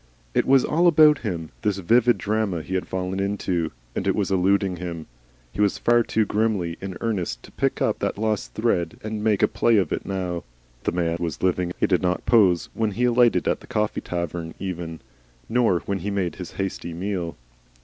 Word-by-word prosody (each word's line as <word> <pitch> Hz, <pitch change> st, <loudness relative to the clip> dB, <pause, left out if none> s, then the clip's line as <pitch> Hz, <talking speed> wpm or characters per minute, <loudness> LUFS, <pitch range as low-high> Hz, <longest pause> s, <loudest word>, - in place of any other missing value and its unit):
It -, -, +1 dB
was 135 Hz, -1 st, +5 dB
all 170 Hz, +3 st, +3 dB
about 155 Hz, -3 st, +6 dB
him, 85 Hz, -8 st, -4 dB
this 105 Hz, -2 st, 0 dB
vivid 115 Hz, +5 st, +3 dB
drama 105 Hz, -4 st, -1 dB
he 95 Hz, -, -6 dB
had 95 Hz, -, -1 dB
fallen 95 Hz, +1 st, -3 dB
into, 95 Hz, -4 st, -1 dB, 0.2 s
and -, -, -2 dB
it -, -, +2 dB
was -, -, -1 dB
eluding 95 Hz, 0 st, +2 dB
him. 85 Hz, -2 st, -5 dB, 0.5 s
He 100 Hz, -, -3 dB
was 100 Hz, -2 st, +2 dB
far 120 Hz, 0 st, +4 dB
too 110 Hz, -1 st, +1 dB
grimly 105 Hz, -5 st, 0 dB
in 95 Hz, -1 st, -5 dB
earnest 90 Hz, -, -2 dB
to -, -, -13 dB
pick -, -, 0 dB
up -, -, 0 dB
that -, -, -2 dB
lost 110 Hz, -1 st, -2 dB
thread 115 Hz, 0 st, 0 dB
and 110 Hz, -1 st, -4 dB
make 105 Hz, -3 st, +2 dB
a -, -, +6 dB
play 110 Hz, +1 st, +2 dB
of 95 Hz, -6 st, +1 dB
it -, -, -3 dB
now. 90 Hz, -3 st, -3 dB, 0.4 s
The -, -, +2 dB
man 85 Hz, -1 st, 0 dB
was 85 Hz, -1 st, -4 dB
living. 90 Hz, -1 st, +1 dB
He -, -, +3 dB
did 90 Hz, -3 st, +2 dB
not 90 Hz, 0 st, -1 dB
pose 95 Hz, -7 st, +4 dB
when 110 Hz, -1 st, 0 dB
he 120 Hz, -, -1 dB
alighted 120 Hz, -1 st, +4 dB
at -, -, +1 dB
the -, -, -15 dB
coffee 105 Hz, 0 st, -1 dB
tavern 85 Hz, -1 st, -4 dB
even, 85 Hz, -4 st, -5 dB, 0.5 s
nor 115 Hz, -7 st, +2 dB
when 100 Hz, -1 st, -3 dB
he 100 Hz, +4 st, -3 dB
made 95 Hz, -4 st, -2 dB
his 90 Hz, -2 st, -7 dB
hasty 90 Hz, -3 st, -4 dB
meal. 90 Hz, -4 st, -3 dB
95 Hz, 200 wpm, -24 LUFS, 85-110 Hz, 0.5 s, about